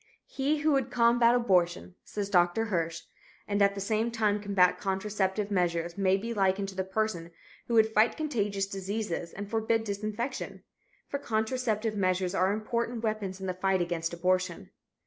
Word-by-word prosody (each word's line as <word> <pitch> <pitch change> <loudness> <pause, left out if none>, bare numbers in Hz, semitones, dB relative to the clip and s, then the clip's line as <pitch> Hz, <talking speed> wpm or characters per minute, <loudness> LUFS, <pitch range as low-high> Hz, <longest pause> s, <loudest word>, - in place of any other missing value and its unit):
"He 290 +2 -1
who 310 +1 +3
would 270 -3 +1
combat 235 0 +4
abortion," 185 -6 +1
says 205 -2 -4
Dr. 175 +4 +3
Hirsch, 165 -5 -2 0.4
"and 205 0 0
at 200 0 +4
the - - -4
same 220 +3 0
time 210 -3 0
combat 195 -3 +3
contraceptive 200 +1 -1
measures 170 -2 0
may 195 -1 +2
be 230 +4 -4
likened 195 -1 +1
to 190 - -10
the 190 - -1
person 190 -3 -2 0.4
who 235 - 0
would 220 0 +4
fight 220 +2 +3
contagious 205 -10 -1
diseases 195 -3 -4
and 200 +1 -6
forbid 225 +1 0
disinfection. 215 +5 -4 0.4
For 280 - -3
contraceptive 220 -2 -1
measures 185 -1 0
are 190 0 +2
important 230 +2 -2
weapons 210 -4 -2
in 190 - -5
the 185 - -1
fight 190 +1 +1
against 170 -1 -2
abortion. 180 - -1
200 Hz, 165 wpm, -29 LUFS, 185-225 Hz, 0.4 s, combat